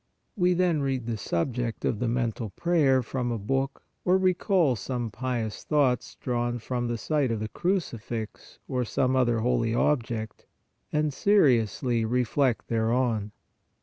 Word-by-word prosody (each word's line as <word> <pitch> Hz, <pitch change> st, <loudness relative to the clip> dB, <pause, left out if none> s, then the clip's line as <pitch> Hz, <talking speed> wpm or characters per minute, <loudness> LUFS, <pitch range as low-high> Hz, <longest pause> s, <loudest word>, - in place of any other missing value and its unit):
We 180 Hz, -3 st, +3 dB
then 175 Hz, -4 st, +2 dB
read 135 Hz, -3 st, -1 dB
the 115 Hz, -1 st, -2 dB
subject 115 Hz, +4 st, -2 dB
of 105 Hz, -, 0 dB
the 125 Hz, -, 0 dB
men 120 Hz, 0 st, +1 dB
tal 110 Hz, 0 st, -6 dB
prayer 145 Hz, -7 st, +3 dB
from 125 Hz, +1 st, -2 dB
a 115 Hz, -, -1 dB
book 135 Hz, +6 st, -2 dB, 0.2 s
or 180 Hz, +1 st, +4 dB
recall 185 Hz, -, +2 dB
some 120 Hz, +2 st, -3 dB
pious 120 Hz, -2 st, -3 dB
thoughts 140 Hz, -5 st, +1 dB
drawn 120 Hz, -1 st, -1 dB
from 120 Hz, +1 st, -3 dB
the 120 Hz, 0 st, -2 dB
sight 145 Hz, +3 st, 0 dB
of 115 Hz, -2 st, -1 dB
the 110 Hz, -, -3 dB
crucifix 120 Hz, -, -3 dB
or 125 Hz, -1 st, -1 dB
some 130 Hz, +2 st, 0 dB
other 120 Hz, -3 st, +2 dB
holy 115 Hz, -1 st, +1 dB
object, 115 Hz, -5 st, -1 dB, 0.4 s
and 150 Hz, -1 st, +1 dB
seriously 125 Hz, -, +3 dB
reflect 125 Hz, +2 st, +1 dB
thereon. 115 Hz, -2 st, 0 dB
125 Hz, 150 wpm, -27 LUFS, 115-140 Hz, 0.4 s, or